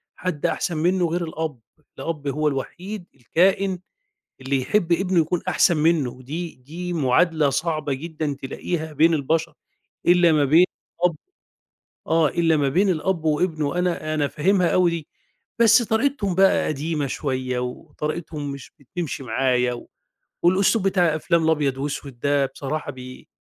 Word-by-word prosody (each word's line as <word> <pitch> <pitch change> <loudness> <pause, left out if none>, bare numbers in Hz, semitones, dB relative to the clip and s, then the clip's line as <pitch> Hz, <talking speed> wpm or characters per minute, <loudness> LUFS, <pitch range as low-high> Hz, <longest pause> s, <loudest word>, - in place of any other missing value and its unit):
حد 180 -5 -3
أحسن 170 - -1
منّه 175 +2 +2
غير 170 +1 -1
الأب، 160 -5 -4 0.4
الأب 150 -3 -4
هو 150 +2 0
الوحيد 175 +8 -4
الكائن 185 - +1 0.6
اللي 135 0 0
يحب 175 +4 +1
ابنه 180 0 +2
يكون 165 +2 0
أحسن 175 - +3
منُّه، 155 -4 +2
ودي 150 +7 -6
دي 170 +8 -7
مُعادلة 155 +1 +2
صعبة 155 0 -1
جدًا 155 0 -4
تلاقيها 160 +3 -4
بين 165 +3 +4
البشر 160 +2 0 0.5
إلّا 175 -1 +5
ما 150 -2 +3
بين 160 +6 +6 0.4
الأب 175 -3 +2 0.9
آه، 160 -1 +3
إلّا 165 -2 +2
ما 140 -2 +1
بين 190 +8 +2
الأب 170 0 0
وابنه، 155 -1 0
أنا 170 -3 -1
أنا 150 -2 +1
فاهمها 180 +4 +2
أوي 180 -2 +4
دي. 165 -3 -5 0.5
بس 230 +1 +6
طريقتهم 220 -4 0
بقى 195 0 +4
قديمة 150 0 -2
شوية 130 -2 -2
وطريقتهم 150 +4 -5
مش 140 -1 -9
بتمشي 145 0 -5
معايا 125 +1 +1
و 120 - -10 0.5
والأسلوب 195 +3 +3
بتاع 175 -4 +2
أفلام 165 +1 +1
الأبيض 150 -4 +1
وأسود 140 -2 -5
ده 140 +1 +2
بصراحة 150 -1 -4
بي 130 -1 -11
160 Hz, 145 wpm, -23 LUFS, 140-175 Hz, 0.9 s, بين